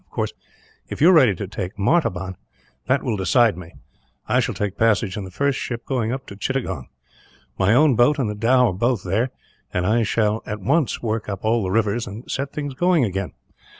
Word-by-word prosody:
Of - - -40
course, - - -3 0.6
if - - -6
you 170 +5 +7
are - - +5
ready 130 - +5
to 95 - -5
take 95 -1 -6
Martaban, 95 - 0 0.5
that 130 +2 +2
will 115 -5 -1
decide 110 +3 +3
me; 90 -1 -9
and - - -20 0.6
I - - +5
shall - - -1
take 105 -2 -2
passage 105 -4 +1
in 105 - -5
the - - -8
first 140 +8 0
ship 120 -1 -5
going 120 -4 -1
up 130 +1 -4
to 100 - -10
Chittagong. 100 - -3 0.7
My 100 +4 +4
own 145 -1 +5
boat 120 +6 +4
and 130 -5 0
the 105 - -2
dhow 120 +3 +3
are - - -5
both 115 +2 0
there, 105 +8 0 0.4
and 90 -1 -1
I 110 +5 +2
shall 110 0 +1
at 105 0 -4
once 140 - 0
work 110 -2 -2
up 100 +1 -5
all 115 +1 +2
the 95 - -2
rivers, 110 +3 0
and 105 +4 -8
set 140 +1 -3
things 145 -2 -4
going 175 +1 +2
again. 95 - -3
110 Hz, 220 wpm, -22 LUFS, 100-130 Hz, 0.7 s, you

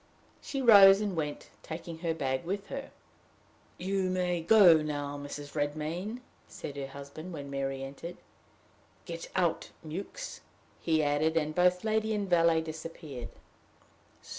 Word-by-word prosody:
She 275 -2 -3
rose 200 -4 +9
and 205 -3 -2
went, 150 -2 -4
taking 165 0 -7
her 165 -1 -1
bag 130 -2 -1
with 195 +3 -4
her. 275 0 -5 0.9
"You 190 0 -1
may 180 -2 0
go 175 -3 +7
now, 145 -1 -3
Mrs. 145 0 -7
Redmain," 155 +10 -3 0.3
said 145 - -8
her 140 -1 -4
husband 140 +6 -9
when 140 -3 -7
Mary 135 -1 -2
entered. 140 +6 -8 0.9
"Get - - -7
out, - - +1 0.2
Mewks," 195 - -6 0.4
he 160 -2 +1
added; 150 +3 +1
and 155 -1 0
both 180 +1 +3
lady 220 0 +1
and 205 -1 -2
valet 165 -2 +4
disappeared. 155 -5 -7
165 Hz, 135 wpm, -30 LUFS, 145-190 Hz, 0.9 s, rose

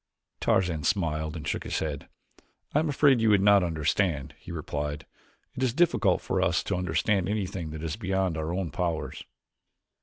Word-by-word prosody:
Tarzan 85 -5 +1
smiled 80 -3 0
and 75 -2 -6
shook - - -2
his - - -2
head. 75 -3 -4 0.6
"I 150 - +4
am 160 0 0
afraid 140 -4 +4
you 110 - +4
would 105 -2 +5
not 100 -1 +6
understand," 80 -2 0
he - - -10
replied. 75 -2 -4 0.5
"It - - -6
is 130 -2 +1
difficult 175 +1 +3
for - - -1
us - - +2
to - - -1
understand 90 +2 0
anything 95 -5 -2
that 80 +1 -7
is 80 +3 -3
beyond 95 -4 0
our 80 +1 -3
own 90 -3 -2
powers." 85 -1 -3
90 Hz, 175 wpm, -27 LUFS, 80-100 Hz, 0.6 s, not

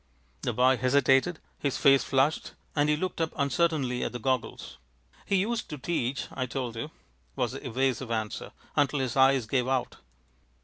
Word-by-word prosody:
The - - -1
boy 130 +1 +3
hesitated. 135 +6 +3 0.2
His 140 -2 -1
face 135 -1 +5
flushed, 135 +3 +1 0.2
and 145 0 +2
he 150 - +3
looked 180 0 -3
up 160 - -1
uncertainly 140 -4 +1
at - - -2
the - - -3
goggles. 130 - -3 0.5
"He 200 - +2
used 220 +5 0
to 150 - -5
teach, 135 -3 -2
I 130 -1 -3
told 120 -1 -4
you," 115 - -4 0.5
was - - 0
the - - -7
evasive 130 0 -1
answer, 110 -2 -3 0.2
"until 145 0 +2
his 130 -3 -1
eyes 135 -2 +4
gave 125 +2 0
out." 130 -1 -1
135 Hz, 170 wpm, -28 LUFS, 125-150 Hz, 0.5 s, face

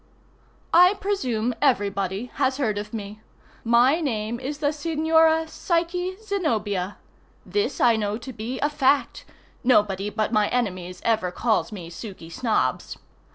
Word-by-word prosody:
_ - - -35 0.7
I 360 +3 +7
presume 250 - -1
everybody 200 -4 0
has 260 0 +2
heard 220 -7 0
of 210 +1 -7
me. 210 -1 -7 0.4
My 245 +7 +4
name 230 -5 -2
is 275 +3 -4
the 290 -1 +1
Signora 320 +1 +2
Psyche 355 +3 -1
Zenobia. 220 - -2 0.5
This 415 +1 -1
I 235 -2 +4
know 210 0 -1
to 245 +3 -9
be 235 +4 -5
a 290 - +2
fact. 280 -1 +1 0.4
Nobody 210 -5 +2
but 215 +1 -2
my 210 -1 +3
enemies 185 -7 -2
ever 220 -5 +2
calls 220 +5 0
me 175 -5 -8
Suky 180 -3 -9
Snobbs. 225 +4 -1
235 Hz, 140 wpm, -24 LUFS, 210-300 Hz, 0.7 s, I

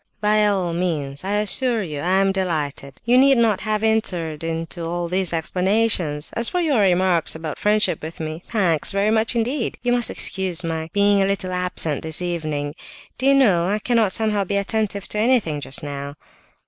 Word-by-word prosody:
"By 210 0 +2
all 185 -4 -1
means! 155 -5 -3
I 195 +2 -2
assure 220 +2 0
you 150 -5 -6
I 185 +5 +1
am 195 0 +2
delighted—you 170 - -1
need 270 0 +5
not 225 -4 +2
have 215 0 -1
entered 175 -8 -1
into 165 +1 -4
all 170 +1 -3
these 185 +1 0
explanations. 180 -2 +1
As 230 0 +3
for 360 - -1
your 305 -8 +1
remarks 185 -4 +2
about 160 -2 -6
friendship 210 -5 +1
with 160 +2 -8
me—thanks, 165 +1 -1
very 200 +2 +1
much 225 +1 +1
indeed. 235 +2 -2
You 245 - +1
must 245 -1 +1
excuse 185 -2 +1
my 160 -1 -4
being 200 0 +3
a 195 - +2
little 195 -2 -2
absent 180 -5 0
this 160 -1 0
evening. 155 -5 -3 0.5
Do 260 - +1
you 275 - +5
know, 190 -11 +3
I 205 +2 0
cannot 225 -2 +1
somehow 215 -1 +1
be 200 +1 -2
attentive 200 0 -2
to 210 - -2
anything 215 - +1
just 135 - -4
now?" 140 0 -6
190 Hz, 180 wpm, -21 LUFS, 165-215 Hz, 0.5 s, need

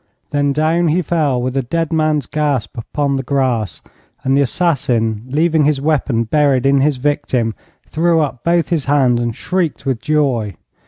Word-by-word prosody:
Then 145 -1 +1
down 160 +4 +1
he 170 +4 +1
fell 150 -6 0
with 125 +1 -3
a 135 - +2
dead 165 +6 -2
man's 155 -3 +1
gasp 145 -8 -2
upon 140 +4 -2
the - - -1
grass, 125 - -1 0.4
and 135 +1 +2
the 140 - +3
assassin, 125 - 0
leaving 155 +2 +2
his 150 -2 +2
weapon 140 -5 0
buried 135 +1 +2
in 135 0 +4
his 145 -1 +1
victim, 125 -4 -1 0.3
threw 165 +1 +1
up 135 -6 -2
both 170 0 +1
his 160 -5 0
hands 130 -4 +2
and 120 -2 -2
shrieked 180 -5 -2
with 130 -4 -1
joy. 135 -9 0
140 Hz, 170 wpm, -17 LUFS, 125-155 Hz, 0.4 s, in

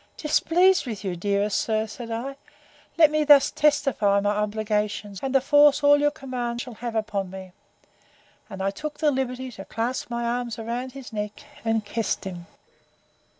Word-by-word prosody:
—Displeased 345 +3 +3
with 215 -4 -5
you, 185 -3 -2
dearest 200 +3 0
sir! 220 -1 0
said 230 +2 -8
I: 240 +5 -4 0.6
Let 315 -3 +6
me 305 0 +2
thus 290 -2 +6
testify 275 -9 +2
my 205 +1 +1
obligations, 210 -1 -2
and 270 0 -2
the - - +7
force 290 +1 +5
all 290 0 +6
your 295 0 +3
commands 250 -5 -4
shall 250 - -9
have 235 +1 -6
upon 210 -4 -2
me. 190 0 -9 1.0
And 195 -2 -6
I 195 - +1
took 300 +8 -6
the 305 -2 +2
liberty 260 -1 -3
to 195 -4 -10
clasp 235 +3 -3
my 235 0 -2
arms 240 -1 -2
about 240 +3 -4
his 270 -4 -10
neck, 210 +4 -5 0.2
and 225 -2 0
kissed 225 -1 -2
him. 175 -3 -7
235 Hz, 170 wpm, -25 LUFS, 210-275 Hz, 1.0 s, the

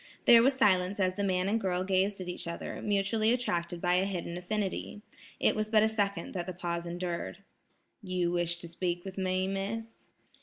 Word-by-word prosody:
There 235 -1 +9
was 265 +3 +4
silence 190 -5 +3
as 185 -1 +2
the 200 +2 -2
man 185 -1 +1
and 220 +3 +1
girl 185 -1 0
gazed 195 +1 +1
at 180 - -6
each 180 -1 -5
other, 170 - -5
mutually 210 +2 +2
attracted 175 -8 -1
by 175 +1 +2
a 190 - +2
hidden 175 -3 -3
affinity. 205 +2 -3 0.4
It - - +3
was 215 0 -1
but 215 -1 +5
a - - +5
second 200 -5 -1
that 175 -1 -3
the 185 - -4
pause 170 -1 -3
endured. 175 +2 -4 0.6
"You 185 -3 -1
wish 175 -1 0
to 175 - -8
speak 175 +1 -3
with 195 0 -6
me, 185 0 0
Miss?" 205 +4 -4
185 Hz, 195 wpm, -30 LUFS, 175-205 Hz, 0.6 s, There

